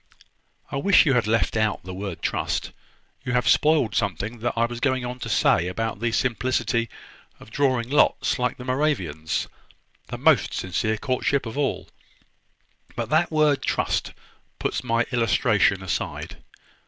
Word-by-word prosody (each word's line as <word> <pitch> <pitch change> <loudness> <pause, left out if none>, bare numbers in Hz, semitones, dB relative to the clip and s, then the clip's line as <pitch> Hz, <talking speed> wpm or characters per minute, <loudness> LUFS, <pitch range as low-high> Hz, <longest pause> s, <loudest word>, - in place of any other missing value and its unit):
"I - - -2
wish 195 +6 +5
you 140 - +3
had 120 -4 +1
left 115 +1 +1
out 110 -5 0
the 90 +1 -7
word 95 -2 -6
`trust.' - - -2 0.5
You 125 -2 -3
have 125 0 +1
spoiled 150 -8 +3
something 100 +4 -2
that 120 +2 -1
I 115 - +3
was 120 0 -6
going 130 -1 0
on 125 +1 -6
to - - -5
say 85 - +3
about 115 +3 -3
the 115 +1 0
simplicity 120 -1 0 0.5
of - - -15
drawing 130 -4 +1
lots 145 -1 +2
like 125 0 -1
the 125 - -9
Moravians, 125 - -1 0.6
the - - -6
most - - +3
sincere 100 +5 -1
courtship 130 +1 0
of 115 - -6
all: 145 -1 -1 1.1
but - - -3
that 160 +3 +3
word 155 -3 +2
`trust' - - -1 0.4
puts - - -2
my 115 -1 +1
illustration 115 -5 +2
aside. 95 - -4
120 Hz, 155 wpm, -24 LUFS, 110-135 Hz, 1.1 s, wish